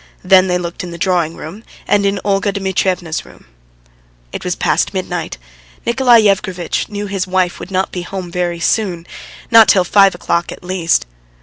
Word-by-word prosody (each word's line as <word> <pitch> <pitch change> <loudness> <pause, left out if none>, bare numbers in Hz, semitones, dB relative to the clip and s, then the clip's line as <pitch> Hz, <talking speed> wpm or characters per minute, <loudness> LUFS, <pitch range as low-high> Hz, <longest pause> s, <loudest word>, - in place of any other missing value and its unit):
Then 185 0 +5
they 180 -1 +1
looked 175 0 -5
in 180 - -6
the 170 - -8
drawing 170 -2 0
room, 190 +8 -9 0.2
and 200 -1 +2
in 200 0 -1
Olga 200 0 +1
Dmitrievna's 190 -4 -1
room. - - -18 0.9
It - - -6
was - - -2
past - - 0
midnight. - - -4 0.5
Nikolay 240 -1 +4
Yevgrafitch 185 -4 0
knew 205 0 -4
his 195 -1 -3
wife 185 -1 0
would - - -8
not 190 0 -1
be 180 - -4
home 180 0 -6
very 175 -1 -2
soon, 175 -2 -1 0.5
not 225 -1 +8
till 185 - +4
five 195 +1 +4
o'clock 170 -1 -1
at - - -10
least. 175 - 0
185 Hz, 175 wpm, -16 LUFS, 175-200 Hz, 0.9 s, not